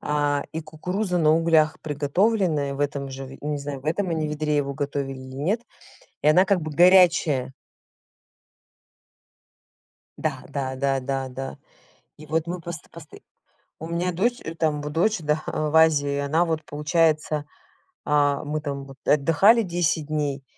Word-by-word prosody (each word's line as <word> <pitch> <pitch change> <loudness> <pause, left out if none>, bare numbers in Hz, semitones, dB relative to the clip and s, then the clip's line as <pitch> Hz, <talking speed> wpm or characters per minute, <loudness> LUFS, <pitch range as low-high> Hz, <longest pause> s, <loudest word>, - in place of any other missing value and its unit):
а, 145 -1 0
и 160 - -3
кукуруза 180 +5 -3
на 155 -1 +4
углях 160 -2 +3
приготовленная 150 0 0
в 140 - -6
этом 140 -1 -2
же, 135 0 -7
в 135 +1 -11
не 150 -1 -2
знаю, 140 -1 -6
в - - -22
этом 185 +4 0
они 160 -2 -1
ведре 150 0 -1
его 140 -1 -1
готовили 140 -1 -3
или 130 0 -10
нет. 190 - 0 0.6
И - - +3
она 180 +5 +5
как 190 -3 +2
бы 155 0 -5
горячая. 170 -6 +4 2.7
Да, - - -3
да, 130 -2 -3
да, 135 0 0
да, 135 0 -3
да. 135 +1 -6 0.6
И 155 - -12
вот 160 +2 -1
мы 175 0 -4
пост 165 -3 -8
посто 165 -3 -12 0.6
у 160 - -7
меня 175 +2 -1
дочь, 235 +8 0
э, 165 - -5
там 155 -3 0
в 150 - -4
дочь, 180 +7 +1
да, 150 +1 0
в 155 0 -2
Азии, 145 -3 +4
она 155 +5 +1
вот 160 -2 -2
получается, 155 0 0 0.6
а 145 -1 +2
мы 150 +1 -3
там 140 -2 -5
вот 135 0 -13
отдыхали 165 +11 +4
10 170 -4 -1
дней, 145 -3 -2
150 Hz, 160 wpm, -24 LUFS, 140-165 Hz, 2.7 s, она